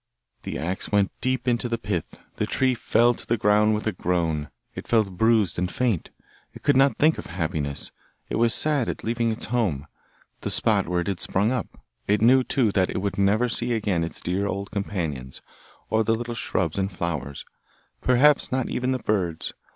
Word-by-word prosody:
The - - -5
axe 90 +4 -4
went 100 -2 +3
deep 130 -1 -1
into 120 0 +1
the 115 - 0
pith; 100 -7 -4 0.2
the - - -1
tree 130 -1 +1
fell 120 0 +3
to - - -10
the 115 - +1
ground 105 +1 +3
with 105 - -4
a 110 - +1
groan; 80 -6 -1 0.2
it - - -8
felt 110 -4 +2
bruised 110 -3 +2
and 90 0 -1
faint. 120 -9 0 0.5
It - - -12
could 145 - +3
not 135 +1 +4
think 155 +2 +3
of - - -7
happiness, 80 -5 -3 0.4
it - - -2
was 115 0 +3
sad 145 -1 +2
at - - -5
leaving 115 0 0
its 110 - -3
home, 105 - -1 0.5
the - - -4
spot - - +2
where 90 0 0
it - - -5
had 95 -3 -2
sprung 105 +5 +1
up; 125 -5 -4 0.2
it 105 +1 +3
knew, 130 +4 +5
too, 125 -5 +1
that 95 -2 +1
it - - -3
would 100 0 -2
never 105 +5 +3
see 120 0 -1
again 100 -7 0
its 85 - -5
dear 95 +3 -1
old 100 0 -4
companions, 80 -11 -4 0.5
or 110 0 +3
the 115 +1 +2
little 120 +1 -4
shrubs 90 -6 -1
and 95 +1 -1
flowers, 80 -6 -4 0.6
perhaps 135 +4 +4
not 130 -1 0
even 125 +1 0
the - - 0
birds. 95 -9 -2
105 Hz, 195 wpm, -25 LUFS, 90-120 Hz, 0.6 s, knew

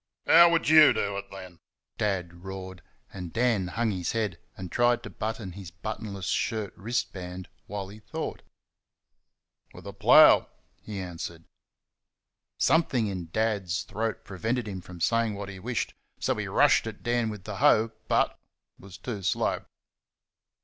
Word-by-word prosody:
"How 170 +1 +8
would 165 -1 +1
you 155 -1 +8
do 100 0 -1
it 100 - -5
then?" 95 -3 -10 0.4
Dad 90 -4 -2
roared, 95 -1 -7 0.3
and 90 -3 -7
Dan 115 -5 +1
hung 115 +4 0
his 90 -3 -2
head 105 -7 -1 0.2
and 95 -2 -7
tried 120 0 +2
to 105 - -8
button 110 +1 -4
his 95 -1 -9
buttonless 100 +1 -6
shirt 110 0 -1
wrist 115 +6 -2
band 90 -1 -7 0.2
while 100 -1 -5
he 105 +2 -11
thought. 105 - -5 1.3
"With - - -12
a - - -7
plough," - - +7 0.3
he 105 -2 -6
answered. 85 -2 -6 1.1
Something 140 -8 +2
in 90 -5 -4
Dad's 100 -4 -1
throat 110 +1 -3
prevented 110 +5 -2
him 95 -3 -5 0.2
saying 115 +3 +1
what 100 0 -6
he 95 -1 -8
wished, 120 +4 -2 0.3
so - - +1
he - - -4
rushed - - +4
at - - -8
Dan 120 -1 +1
with 105 -3 -7
the 105 -1 -6
hoe, 110 +3 +4 0.2
but - - +1 0.4
was 95 -1 -12
too 105 -1 -5
slow. 95 - 0
100 Hz, 150 wpm, -27 LUFS, 95-115 Hz, 1.3 s, How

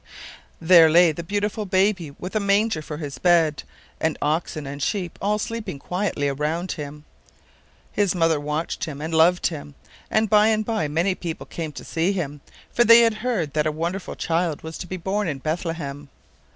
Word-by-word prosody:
There 165 -1 +7
lay 170 +1 +6
the 155 - -6
beautiful 205 +4 -2
baby, 190 -3 +1
with 180 +8 -8
a - - +3
manger 200 -3 +1
for 150 0 -7
His 145 -3 -6
bed, 165 -5 +3 0.4
and 160 -1 0
oxen 155 0 -1
and 140 +1 -6
sheep 180 +2 -2
all 210 +2 +1
sleeping 225 -6 -4
quietly 180 -2 -2
round 155 +6 -2
Him. 150 -1 -7 0.9
His 200 -3 +1
mother 165 -3 +2
watched 150 +3 -3
Him 145 -3 -7
and 160 +2 -4
loved 170 +3 +4
Him, 145 -3 -3 0.3
and 220 0 +2
by 210 0 +5
and 215 -1 +1
by 220 -8 -1
many 165 +6 +1
people 170 -3 -6
came 160 -2 -5
to - - -8
see 170 +4 0
Him, 145 -6 -4 0.3
for 240 - +4
they 230 +1 +8
had 230 -1 +4
heard 205 - -1
that 155 0 +1
a - - +1
wonderful 170 +5 -4
child 165 -2 -1
was 160 0 -7
to 180 - -6
be 185 - -4
born 195 +3 -1
in 150 -4 -2
Bethlehem. 155 -2 -4
170 Hz, 185 wpm, -23 LUFS, 155-200 Hz, 0.9 s, they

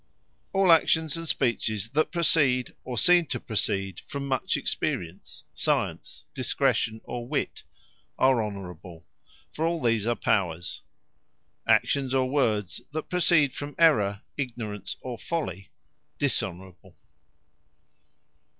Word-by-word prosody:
All 195 -2 +4
Actions, 160 -2 +4
and 165 0 -4
Speeches, 110 -6 0
that 155 +4 +1
proceed, 145 -7 +2
or 125 -2 -5
seem 175 +4 +5
to - - -2
proceed 95 -4 -1
from 140 -2 -4
much 130 -2 0
Experience, 85 +1 -3
Science, - - -1
Discretion, 110 0 0
or 120 -1 -6
Wit, 145 +1 -2 0.6
are 130 -3 +4
Honourable; 90 -5 -8 0.5
For 155 - -3
all 170 0 0
these 115 -4 +1
are 120 - +2
Powers. 90 -5 -1 0.9
Actions, 135 -2 +2
or 130 -1 +2
Words 110 - 0
that 155 0 -5
proceed 170 -6 +4
from 145 0 -6
Errour, 105 -12 +4 0.2
Ignorance, 115 -7 -4
or 125 -3 -6
Folly, 95 - -4 0.5
Dishonourable. 95 - -3
125 Hz, 115 wpm, -27 LUFS, 100-150 Hz, 0.9 s, seem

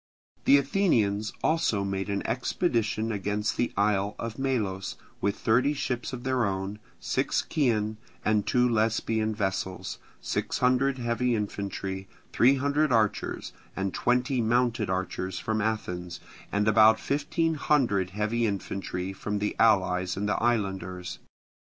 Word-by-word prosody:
The 140 - +7
Athenians 115 - +1
also 155 -11 +2
made 95 0 -2
an 100 0 -2
expedition 115 - 0
against 105 +1 -1
the 120 - 0
isle 100 0 +1
of 115 +1 -5
Melos 105 -9 -1 0.3
with 100 +1 0
thirty 130 +6 +2
ships 125 -3 -2
of 125 -2 -6
their 130 -2 +1
own, 100 0 -2 0.2
six - - 0
Chian, 110 -8 +1 0.3
and 105 -1 +2
two 125 0 +3
Lesbian 110 -1 +1
vessels, 95 -2 -3 0.2
sixteen - - -2
hundred 130 +2 +3
heavy 120 0 0
infantry, 100 -2 -4 0.3
three 130 +3 +5
hundred 140 +2 +1
archers, 110 -3 0 0.2
and 95 -1 -2
twenty 125 +1 +1
mounted 120 -2 +1
archers 95 0 -2
from 110 0 -1
Athens, 90 -5 -3 0.3
and 105 +1 +1
about 110 +1 +6
fifteen 155 +3 0
hundred 125 - +1
heavy 110 +4 0
infantry 95 -2 -3
from 105 +2 -3
the 105 0 -2
allies 95 -4 +3
and 105 +1 -1
the 105 - 0
islanders. 95 -6 -1
110 Hz, 130 wpm, -27 LUFS, 100-125 Hz, 0.3 s, The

